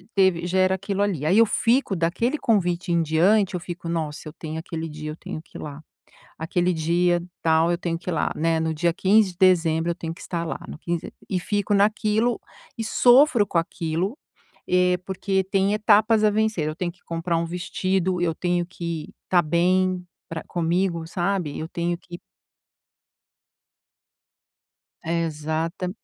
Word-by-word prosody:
teve 185 -3 +3
já 190 +1 +1
era 185 0 +3
aquilo 200 +1 -3
ali. 170 -8 -1
Aí 190 +7 +4
eu 230 - +7
fico 235 -3 +1
daquele 195 - 0
convite 180 -6 0
em 170 -1 +3
diante, 185 +6 +3
eu - - -2
fico: 175 -1 -6
"Nossa, 155 -2 -3
eu - - -13
tenho 160 -1 -6
aquele 165 0 -5
dia, 155 0 -7
eu - - -7
tenho 155 - -7
que - - -13
ir - - -8
lá. 150 0 -7 0.6
Aquele 175 +2 0
dia 175 +2 +2 0.2
tal, 160 +1 +3
eu 170 - 0
tenho 165 -2 -2
que 180 - -6
ir - - 0
lá, 150 - 0
né, 165 0 +1
no 160 0 -1
dia 170 +1 +1
15 195 +1 +3
de - - -30
dezembro, 170 -3 +3
eu - - -4
tenho 165 -2 -5
que - - -14
estar 170 -1 -3
lá, - - -4
no - - -8
quinz" 170 -1 -2 0.3
E 185 -2 0
fico 205 +2 -1
naquilo 215 +3 +2 0.4
e 225 - -2
sofro 245 -1 +5
com 170 - -1
aquilo, 165 - -1 0.5
eh, 180 0 +3
porque 190 0 -1
tem 195 +1 +1
etapas 215 +1 +4
a 210 - +6
vencer. 215 -7 0
Eu 155 - -3
tenho 175 0 -3
que 180 - -29
comprar 170 +1 -2
um 170 - 0
vestido, 180 +1 -1
eu 165 -2 0
tenho 175 -1 0
que 170 -3 -5 0.2
tá 175 -2 +5
bem 180 +3 +1 0.2
pra 165 0 -5
comigo, 170 0 -1
sabe? 175 -3 -2
Eu 160 - -4
tenho 170 0 -2
que 175 0 -11 2.8
Exata 165 +2 -2
175 Hz, 175 wpm, -24 LUFS, 165-195 Hz, 2.8 s, eu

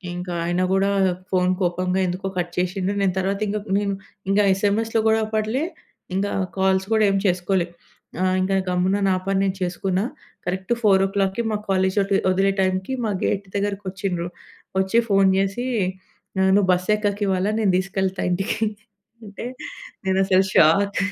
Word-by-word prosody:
ఇంకా 180 0 -5
ఆయన 175 +1 0
గూడా 195 +1 +2 0.4
ఫోను 185 -1 +2
కోపంగా 180 +1 0
ఎందుకో 180 +2 -3
కట్ 175 0 -2
చేషిండు. 185 +2 0
నేను 190 -2 +2
తరువాత 195 +1 -1
ఇంగా 210 +1 -1 0.2
నిన్ 200 -1 0 0.4
ఇంగా 205 +1 +4
ఎస్ఎంఎస్‌లో 210 +3 +1
కూడా 220 0 +3
అప్పట్లే 215 +5 -1 0.5
ఇంగా 200 +1 0 0.3
కాల్స్ 190 0 +2
కూడా 220 -1 +4
ఏం 195 - +2
చేసుకోలే. 180 0 +1 0.5
ఆహ్, 185 0 +2
ఇంగా 190 +1 +1
గమ్మున 180 +2 +1
నా 185 - +3
పని 195 0 +1
నేను 195 -1 0
చేసుకున్న. 185 +1 -1 0.4
కరెక్ట్ 185 +3 -3
4కి 195 0 +2
మా 210 - 0
కాలేజీ 190 0 +1
వదే 195 0 +1
వదిలే 195 +1 +2
టైంకి 185 +5 0
మా 215 - 0
గేట్ 200 0 0
దగ్గరకి 200 0 -1
ఒచ్చిండ్రు. 180 -3 -3 0.5
ఒచ్చి 190 +5 +2
ఫోను 195 -1 +4
చేసి 195 +5 -1 0.8
ఆహ్, 190 0 +4
"నువ్వు 200 -2 +3
బస్సు 180 +3 0
ఎక్కకివ్వాల, 200 -2 0
నేను 200 -4 +2
తీసుకెళ్తా 190 0 -1
ఇంటికి" 195 +4 -1 0.7
అంటే, 200 +2 -8 0.6
నేనసలు 190 0 +3
షాక్. 200 +6 +4
190 Hz, 150 wpm, -22 LUFS, 185-200 Hz, 0.8 s, ఇంగా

